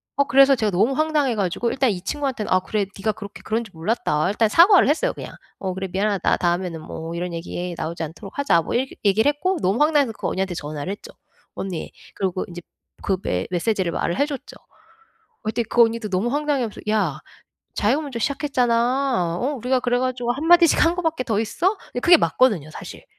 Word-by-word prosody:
어 280 - +3
그래서 275 +2 +6
제가 220 -4 0
너무 210 +9 +2
황당해 300 -4 +1
가지고 200 +3 -1
일단 260 -1 +1
이 180 -3 -4
친구한테는 260 +1 -3
"아 185 - +5
그래 210 +1 -1
네가 215 +2 0
그렇게 205 -1 -10
그런 225 +2 -1
줄 220 - -13
몰랐다." 165 -3 0
일단 215 +2 +2
사과를 355 - +6
했어요 440 +12 +1
그냥. - - -9 0.3
"어 190 -1 -3
그래 190 +1 -4
미안하다. 200 +1 +1
다음에는 175 -1 -1
뭐 165 +1 -7
이런 175 0 -4
얘기 175 +1 -5
나오지 165 +1 -4
않도록 175 +6 -9
하자." 280 -12 +3
뭐 - - -5
이렇게 260 +2 -1
얘기를 210 +7 +4
했고 360 +6 0
너무 195 +8 +1
황당해서 295 -5 +3
그 - - -3
언니한테 190 -1 -2
전화를 150 +3 -5
했죠. 205 - -8 0.4
"언니." 185 -4 -5 0.2
그리고 185 -1 -2
이제 175 0 -8 0.4
그 190 - 0
메 90 - -2
메시지를 185 0 0
말을 170 - -2
해 285 - +3
줬죠. 290 -3 -7
어 - - -31 0.6
그랬더니 225 +2 -1
그 240 - +6
언니도 225 -1 -1
너무 190 +5 0
황당해하면서 285 -7 -1
"야 200 -9 0 0.6
자기가 255 +9 +1
먼저 275 -5 -5
시작했잖아. 245 - +1
어 270 +7 -1
우리가 255 0 0
그래 245 0 +1
가지고 250 -1 -1
1 290 +6 -4
마디씩 340 -1 +6
한 335 +1 +3
거밖에 325 -6 -1
더 220 -4 0
있어?" 360 - 0 0.2
예 245 - -2
그게 345 +4 +7
맞거든요 205 - +2
사실. - - -10
225 Hz, 435 characters per minute, -22 LUFS, 185-275 Hz, 0.6 s, 그게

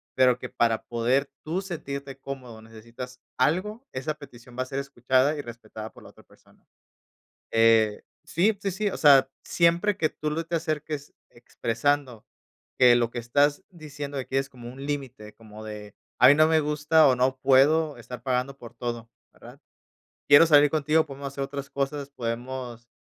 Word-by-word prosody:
pero 125 -1 +4
que - - -8
para 115 -1 0
poder 125 +4 0
tú 170 +5 -2
sentirte 140 -7 -7
cómodo 125 -5 -8
necesitas 115 +3 -11 0.2
algo, 210 - 0
esa 135 +4 -3
petición 125 -4 -14
va - - +1
a - - -10
ser 135 +1 -4
escuchada 135 +1 +1
y - - -3
respetada 110 -2 -9
por - - -16
la - - -13
otra - - -19
persona, - - -26 0.8
eh, 115 -2 +3 0.2
sí, 200 +5 +1
sí, 195 - -1
sí, 205 +3 -1
o - - -5
sea, 135 -3 +6
siempre 175 +4 +2
que 155 - +1
tú 150 0 -4
lo 165 +2 -3
te 170 0 -2
acerques 150 -2 -4 0.2
expresando 120 +1 -2 0.5
que 125 -1 +7
lo 120 -1 +1
que 120 - -4
estás 145 +5 +1
diciendo 145 -4 -8
de 130 - -2
aquí 135 - -3
es 135 0 -1
como 120 -1 -10
un 135 +2 -10
límite, 130 -7 -5
como 110 -1 -13
de: 105 -1 -9 0.2
"A 125 - +7
mí - - +8
no 155 +1 +5
me 160 -1 +3
gusta 150 +1 +3
o 130 - +4
no 130 +1 +1
puedo 140 +3 +3
estar 120 0 -10
pagando 130 +1 -1
por 120 -1 -12
todo, 120 -1 -6 0.2
¿verdad? - - -15 0.7
Quiero 145 +3 +9
salir 145 -1 +6
contigo, 155 +1 +2
podemos 140 0 -8
hacer 140 0 -4
otras 140 0 -6
cosas, 140 0 -3
podemos 120 -1 -5
135 Hz, 175 wpm, -26 LUFS, 120-150 Hz, 0.8 s, Quiero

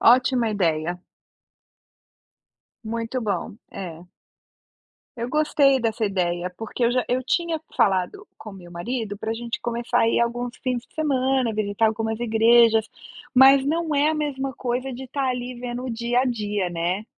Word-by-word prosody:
Ótima 250 -1 +4
ideia. 175 -3 0 1.9
Muito 230 +3 -3
bom. 200 -1 -3
É. 175 -2 -8 1.1
Eu 235 +1 -3
gostei 285 -2 +3
dessa 225 -1 -1
ideia, 180 -3 -1
porque 225 +3 -3
eu 235 - +3
já 250 -1 +1
eu 255 +1 0
tinha 330 +3 0 0.2
falado 195 - +1
com 215 - -10
o - - -12
meu 180 -3 -12
marido 205 +4 -4
para 220 - -3
gente 235 0 -5
começar 240 +1 -1
a 225 - +4
ir 230 - +2
alguns 240 +1 -2
fins 250 -2 -2
de - - -32
semana, 265 -5 +1
visitar 210 +1 +1
algumas 220 +1 -2
igrejas, 225 -1 +4 0.5
mas 270 +1 +7
não 315 +2 0
é 290 +1 +3
a - - -1
mesma 275 -3 -2
coisa 255 +1 -3
de 260 +2 -7
estar 270 +1 -2
ali 250 0 -3
vendo 245 +1 -5
o 255 - -3
dia 235 +2 0
a - - +1
dia, 210 -6 -1
né. 175 +5 -2
235 Hz, 160 wpm, -24 LUFS, 215-260 Hz, 1.9 s, mas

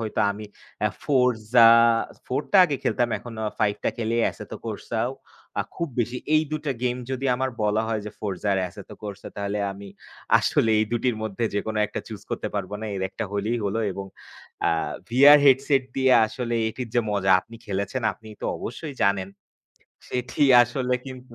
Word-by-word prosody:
হইতো। 110 -2 -2
আমি 105 +1 -8 0.5
'ফোর্জা' 120 -4 +4 0.5
4 130 +4 -1
টা - - +6
আগে 145 -5 -1
খেলতাম, 120 -1 +1
এখন 120 -2 -10 0.2
5 105 -1 +2
টা - - +3
খেলে 115 0 -1
'এসেতকোর্সাও'। 115 +3 -4 0.5
আ - - +1
খুব 170 - -3
বেশি 120 +2 -2 0.2
এই 155 - +5
দুটা 150 -2 -2
গেম 125 0 0
যদি 130 +1 -3
আমার 130 +1 -1
বলা 105 +1 +2
হয় 110 -1 -1
যে - - -5
'ফোর্জা 100 -1 -4
আর - - +1
এসেতকোর্সা' 100 +1 -9
তাহলে 100 0 -2
আমি 100 0 -10 0.5
আসলে 115 - +2
এই 110 - +3
দুটির 120 0 0
মধ্যে 110 +1 -2
যেকোন 110 +2 -2
একটা 105 - -5
চুজ 105 -3 -8
করতে 105 - -2
পারব 100 -1 -3
না। - - -5
এর 95 - -3
একটা 115 - -4
হলেই 105 +4 -1
হল 100 +2 -1 0.2
এবং 100 0 -6 0.6
আ - - +3 0.4
ভিআর 140 +5 +8
হেডসেট 135 +1 +4
দিয়ে 130 -1 +4
আসলে 120 +1 -4
এটির 125 +2 -6
যে 120 - +4
মজা, 95 -2 +1
আপনি 115 +4 -14
খেলেছেন 100 +5 -2
আপনি 110 - -15
তো - - -3
অবশ্যই 140 +5 -6
জানেন। 100 -1 +2 0.8
সেটি 125 +3 -2 0.2
আসলে 125 +1 -1
কিন্তু 130 -2 -10
115 Hz, 170 wpm, -24 LUFS, 105-125 Hz, 0.8 s, ভিআর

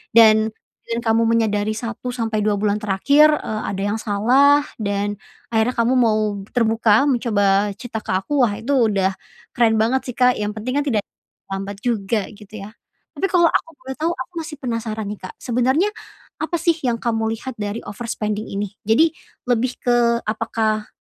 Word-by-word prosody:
Dan 220 -1 +7 0.4
dengan 230 0 -3
kamu 225 0 +3
menyadari 215 -2 +1
1 235 +2 -5
sampai 225 -2 -1
2 210 0 +1
bulan 205 +1 0
terakhir, 230 +9 +4 0.2
eee, 215 0 -3
ada 195 0 -3
yang 205 +2 -1
salah 260 +9 +4 0.2
dan 205 0 -2 0.3
akhirnya 225 +3 +1
kamu 235 +2 +2
mau 220 -3 +3 0.4
terbuka 225 0 +3
mencoba 205 -6 +2
cerita 225 0 -6
ke - - -6
aku, 275 +10 -1
wah, 205 - -3
itu 230 +6 -4 0.2
udah 195 -2 +1 0.4
keren 230 -2 +3
banget 230 +5 +2
sih 245 - -5
Kak, 250 -3 +3
yang 210 +1 -3
penting 255 +6 -2
kan 290 - -1
tidak 215 -6 +1 0.5
lambat 195 +1 -4
juga, 220 -3 -1
gitu 210 0 -14
ya. 210 - -9 0.4
Tapi, - - -2
kalau 345 -2 +4
aku - - 0
boleh 265 0 -6
tahu, 330 +2 +1
aku 260 +7 -7
masih 310 -2 -7
penasaran 220 -4 -3
nih, 210 - -6
Kak. - - -11
Sebenernya 260 - +1 0.5
apa 345 - -2
sih 335 -1 +3
yang 240 -2 +2
kamu 225 -1 0
lihat, 240 +1 -8
dari 205 +2 -3
overspending 215 -1 -4
ini. 200 0 -4 0.2
Jadi 315 +9 +5 0.4
lebih 245 +1 +1
ke 240 -1 +3
apakah 220 -1 -1
225 Hz, 170 wpm, -21 LUFS, 210-245 Hz, 0.5 s, Dan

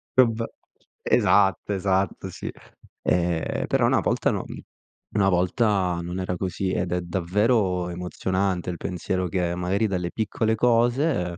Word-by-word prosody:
vabbè. 115 -3 +4 0.6
Esatto, 100 0 +3
esatto, 95 -1 0
sì, - - -6 0.5
ehm, 85 -2 0
però - - +2
una - - +3
volta, - - +1
no - - -3 0.7
una 100 -2 +3
volta 90 0 +1
non 90 +2 -4
era 90 -1 -2
così 95 0 -2
ed 90 -1 -1
è 90 - 0
davvero 90 +1 +1
emozionante 90 +1 -2
il 90 - -4
pensiero 90 +1 -2
che, 90 -1 -1
magari, 95 +5 0
dalle 90 -3 -2
piccole 110 +1 0
cose, 120 - +2
95 Hz, 130 wpm, -25 LUFS, 90-105 Hz, 0.7 s, vabbè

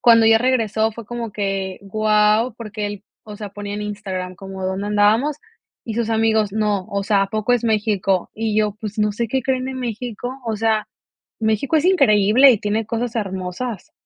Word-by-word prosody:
cuando 230 -2 +6
ella 225 0 +6
regresó 225 -3 +1
fue 230 0 -9
como 235 -1 -5
que 195 -2 -2
guau, 215 +3 +2
porque 210 -2 -5
él, 205 0 -7 0.2
o 210 -1 -9
sea, 210 -2 -7
ponía 205 0 -6
en 210 - -4
Instagram 190 -3 -5
como 190 0 -7
dónde 190 +2 -2
andábamos 215 +8 +3 0.5
y 225 - -4
sus 230 -1 -1
amigos, 220 -2 +2
no, 210 -3 0
o 200 0 -2
sea, 200 -2 +3
¿a - - 0
poco 215 +3 0
es 245 -1 +2
México? 205 -4 +1
Y 220 -1 -2
yo, 210 -1 +2
pues, 215 -1 -6
¿no 210 -1 +2
sé 230 +2 -2
qué 265 +1 0
creen 260 0 0
de 265 - -4
México? 245 +1 -5
O 220 -1 -1
sea, 220 -1 0 0.5
México 220 +7 +1
es 310 - +1
increíble 245 - +5
y 220 - 0
tiene 210 +2 -1
cosas 235 +1 -3
hermosas. 190 +2 -4
215 Hz, 190 wpm, -21 LUFS, 205-230 Hz, 0.5 s, cuando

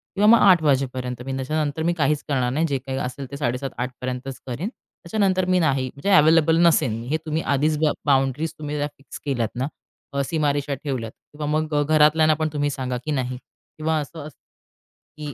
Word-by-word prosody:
किंवा 205 +2 +3
मग 235 - +8
8:00 180 -4 +6
वाजेपर्यंत 130 -3 0
मी, 135 - -3
त्याच्यानंतर 150 +3 -2
मी 175 +1 +2
काहीच 150 -2 0
करणार 130 -4 0
नाही. 160 +3 +1
जे 140 -2 0
काही 135 0 -3
असेल, 135 +1 -4
ते 140 - -5
7:30-8:00 125 -1 -3
पर्यंतच 130 +1 -5
करीन. 140 - -3
त्याच्यानंतर 185 -4 -2
मी 185 0 +2
नाही, 135 -5 +1
म्हणजे 140 +8 -3
अवेलेबल 160 +1 +5
नसेल. 130 -8 +3 0.2
हे 155 - +1
तुम्ही 155 +1 -1
आधीच 150 +2 +1
ब 155 -2 +4
बाउंडरीज, 135 +3 +1
तुम्ही 150 -1 -4
फिक्स 135 -3 -12
केल्या 120 -6 0
ना? 130 +3 -1 0.5
अ, 140 - 0
सीमारेषा 145 -2 0
ठेवल्यात. 125 -6 -3 0.2
किंवा 150 0 -5
मग 155 -1 -2
अ, 145 - +3
घरातल्यांना 155 +1 +4
पण 155 0 -1
तुम्ही 145 -1 0
सांगा, 130 -2 -3
की 155 - -2
नाही 130 -2 -2 0.4
किंवा 160 0 0
असं 155 +3 -7
असतं, 150 - -14 0.8
की 150 -2 -6
145 Hz, 190 wpm, -23 LUFS, 130-155 Hz, 0.8 s, मग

